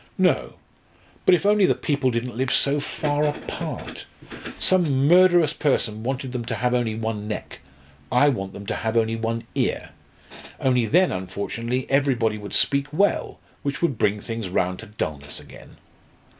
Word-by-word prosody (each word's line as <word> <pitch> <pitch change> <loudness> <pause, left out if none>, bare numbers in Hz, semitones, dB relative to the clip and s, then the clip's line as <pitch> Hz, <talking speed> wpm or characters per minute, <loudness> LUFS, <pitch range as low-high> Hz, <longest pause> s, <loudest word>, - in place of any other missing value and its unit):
"No; - - +2 0.7
but 180 - +8
if 180 - -3
only 205 -2 +5
the - - +3
People 140 -4 0
didn't 120 0 -3
live 130 +2 -1
so 140 +3 +3
far 145 0 -1
apart. 150 -1 -4 0.5
Some 145 -7 +3
murderous 175 -2 +5
person 110 -9 0
wanted 130 +2 -3
them 125 -2 -3
to - - -3
have 125 +1 0
only 120 -3 0
one 110 -2 -3
neck. 105 - -6 0.5
I 135 +4 +5
want 95 -8 -3
them 100 - -9
to - - -2
have 110 +1 -1
only 115 0 +2
one 115 +1 -3
ear. - - -1 0.7
Only 125 -3 +2
then 180 - +4
unfortunately 115 +7 -3
everybody 125 -6 +1
would 105 0 -6
speak 140 0 +2
well 200 +7 +1 0.2
which 140 +3 -3
would 140 -9 0
bring 105 +1 +2
things 115 -2 -5
round 90 0 0
to - - -9
dulness 75 -8 -5
again. - - -14
125 Hz, 160 wpm, -23 LUFS, 110-145 Hz, 0.7 s, but